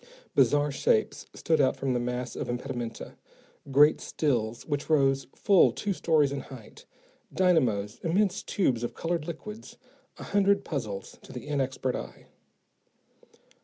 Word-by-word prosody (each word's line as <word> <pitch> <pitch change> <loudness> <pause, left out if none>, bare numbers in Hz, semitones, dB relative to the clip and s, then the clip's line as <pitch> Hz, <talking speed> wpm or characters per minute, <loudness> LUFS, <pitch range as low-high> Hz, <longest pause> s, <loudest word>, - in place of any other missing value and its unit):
Bizarre 145 0 +3
shapes 445 - 0
stood 160 -2 +1
out 130 - +2
from 135 -2 -1
the 125 - 0
mass 125 +1 -3
of - - -4
impedimenta, 120 -2 -5 0.5
great 145 +3 +5
stills 120 -6 -1
which 145 -1 -3
rose 135 -3 +2
full 195 -3 +5
two 205 -2 -2
stories 155 -5 +2
in 140 - -3
height, 125 -5 -12 0.5
dynamos, 125 - +1
immense 190 +3 +1
tubes 130 - 0
of 120 - -4
colored 165 -2 -2
liquids, 210 +7 -8 0.4
a - - -8
hundred 200 0 +2
puzzles 110 - -5
to - - -13
the - - -8
inexpert 135 -3 -1
eye. - - -8
145 Hz, 135 wpm, -28 LUFS, 125-170 Hz, 0.5 s, great